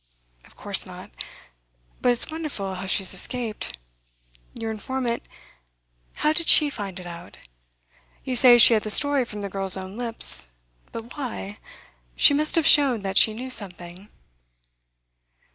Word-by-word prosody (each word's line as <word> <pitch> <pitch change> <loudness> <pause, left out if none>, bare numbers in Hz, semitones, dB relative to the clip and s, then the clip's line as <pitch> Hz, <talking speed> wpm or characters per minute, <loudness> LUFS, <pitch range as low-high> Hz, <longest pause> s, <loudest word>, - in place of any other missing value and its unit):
'Of - - -22
course - - 0
not. - - -12 0.9
But 250 - +3
it's 245 +6 -2
wonderful 295 -12 -5
how 190 +1 -7
she 195 - +1
has 190 - +2
escaped. 215 - -3 0.8
Your 225 -1 -4
informant 240 +2 -4 0.9
how 305 - 0
did 335 0 -2
she 295 -1 +6
find 195 -6 -7
it 180 - -11
out? 170 -1 -11 0.9
You 260 -2 -4
say 245 0 +6
she 235 0 +9
had 215 - +2
the 215 - -6
story 285 +3 +4
from 210 -3 -8
the 200 - -4
girl's 195 0 0
own 190 +4 -9
lips. 230 - +1 0.4
But 230 +1 -9
why? 230 -7 -7 0.6
She - - +5
must 305 +2 +1
have 330 -3 +1
shown 270 -9 +4
that 195 -1 -4
she 220 - +2
knew 255 +3 -7
something. 180 -2 -5
225 Hz, 150 wpm, -23 LUFS, 195-260 Hz, 0.9 s, she